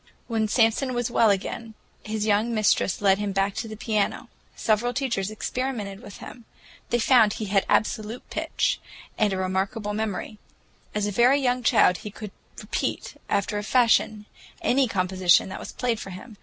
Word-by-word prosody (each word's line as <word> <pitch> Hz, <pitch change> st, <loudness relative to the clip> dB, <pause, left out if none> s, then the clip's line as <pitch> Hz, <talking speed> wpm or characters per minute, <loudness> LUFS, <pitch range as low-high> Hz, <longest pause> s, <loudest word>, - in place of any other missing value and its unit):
When 225 Hz, -2 st, 0 dB
Samson 235 Hz, +3 st, +2 dB
was 240 Hz, 0 st, -1 dB
well 230 Hz, -2 st, +4 dB
again, 215 Hz, +3 st, -2 dB, 0.3 s
his 215 Hz, -1 st, -3 dB
young 215 Hz, +2 st, +2 dB
mistress 205 Hz, -2 st, +1 dB
led 195 Hz, 0 st, +4 dB
him 205 Hz, -1 st, -2 dB
back 195 Hz, +1 st, +1 dB
to 225 Hz, -, -4 dB
the 215 Hz, -1 st, -8 dB
piano. 215 Hz, -2 st, -1 dB, 0.3 s
Several 230 Hz, +3 st, 0 dB
teachers 235 Hz, -8 st, -1 dB
experimented 215 Hz, -2 st, -4 dB
with 200 Hz, -, -11 dB
him. 235 Hz, -, -11 dB, 0.4 s
They 240 Hz, -, +2 dB
found 230 Hz, -3 st, +4 dB
he 215 Hz, -, -4 dB
had 195 Hz, -1 st, +1 dB
absolute 220 Hz, +2 st, 0 dB
pitch, -, -, -1 dB, 0.4 s
and 210 Hz, -2 st, +2 dB
a 190 Hz, -, -1 dB
remarkable 195 Hz, +3 st, -2 dB
memory. 215 Hz, 0 st, -4 dB, 0.6 s
As 210 Hz, -1 st, 0 dB
a 205 Hz, -, -1 dB
very 245 Hz, +7 st, +4 dB
young 250 Hz, -2 st, +1 dB
child 180 Hz, -5 st, +4 dB
he 210 Hz, -, -8 dB
could 210 Hz, 0 st, -9 dB, 0.3 s
repeat, -, -, -3 dB
after 205 Hz, +1 st, 0 dB
a -, -, -5 dB
fashion, 220 Hz, -2 st, +2 dB, 0.4 s
any 265 Hz, +1 st, +3 dB
composition 185 Hz, -3 st, +2 dB
that -, -, -6 dB
was -, -, -8 dB
played 240 Hz, -3 st, -1 dB
for 195 Hz, -, -7 dB
him. 205 Hz, +4 st, -10 dB
215 Hz, 170 wpm, -25 LUFS, 200-235 Hz, 0.6 s, well